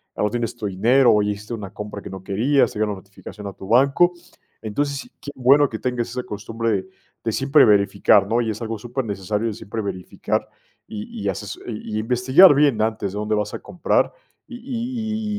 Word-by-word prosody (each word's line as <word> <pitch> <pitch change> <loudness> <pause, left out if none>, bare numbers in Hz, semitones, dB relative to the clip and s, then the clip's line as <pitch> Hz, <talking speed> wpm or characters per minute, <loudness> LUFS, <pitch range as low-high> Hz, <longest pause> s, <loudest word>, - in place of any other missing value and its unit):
ya - - -1
no 105 - +2
tienes 120 -1 -2
tu 115 -3 -6
dinero 120 +7 +4
o 105 - +4
hiciste 105 +2 -3
una 100 -4 -6
compra 105 -1 -7
que 100 - -9
no 95 0 -9
querías, 125 +9 +2
te - - -6
llega 110 - +2
una 100 - -5
notificación 100 +1 -12
a 100 - -5
tu 95 - -11
banco. 140 - +4 0.5
Entonces, 140 +6 -3
qué - - -7
bueno, 135 +3 +5
que 110 - -5
tengas 125 -2 -2
esa 125 +1 -4
costumbre 115 +2 -3
de 95 -2 -2 0.3
de 115 - -1
siempre 140 +2 +4
verificar, 100 -1 +4
¿no?, 115 +3 +1
y 115 - -2
es 110 +2 -7
algo 115 0 -3
supernecesario 105 -3 -3
de 110 - -2
siempre 110 +1 -6
verificar 95 -3 -3 0.4
y 105 -1 -7
y 100 - 0
haces, 100 +2 -5
y 110 -2 -5
investigar 130 - +6
bien 140 -5 +3
antes 110 -3 -1
de 105 - -6
dónde 105 +1 -1
vas 105 0 -2
a - - -6
comprar, 180 - 0 0.3
y 245 - -9
y 230 -4 -3
110 Hz, 205 wpm, -22 LUFS, 105-135 Hz, 0.5 s, investigar